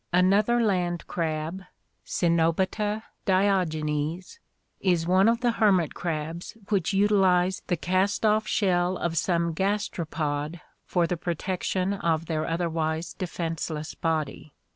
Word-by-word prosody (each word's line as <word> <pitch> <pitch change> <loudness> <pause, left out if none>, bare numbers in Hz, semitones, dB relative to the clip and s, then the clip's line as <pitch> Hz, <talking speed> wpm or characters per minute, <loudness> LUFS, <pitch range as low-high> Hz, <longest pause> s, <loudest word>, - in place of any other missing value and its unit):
Another 200 +6 +4
land 180 -6 0
crab, 160 +2 -3 0.4
Cenobita 185 +6 +1 0.2
diogenes, 175 - 0 0.4
is 175 -4 +1
one 185 +4 +4
of 230 +1 +1
the 240 -1 +3
hermit 195 -8 +2
crabs 165 +4 -4
which 195 -5 +1
utilize 190 -2 +3
the 175 - 0
cast 185 +6 +1
off 215 0 +3
shell 180 -2 +1
of 170 -1 -2
some 170 0 +1
gastropod 160 -5 -2 0.3
for 175 -2 +2
the 175 +1 -2
protection 185 +3 -1
of 165 -4 0
their 155 -1 -2
otherwise 165 -1 -1
defenseless 165 -4 -4
body. 155 -2 -3
175 Hz, 115 wpm, -26 LUFS, 165-195 Hz, 0.4 s, Another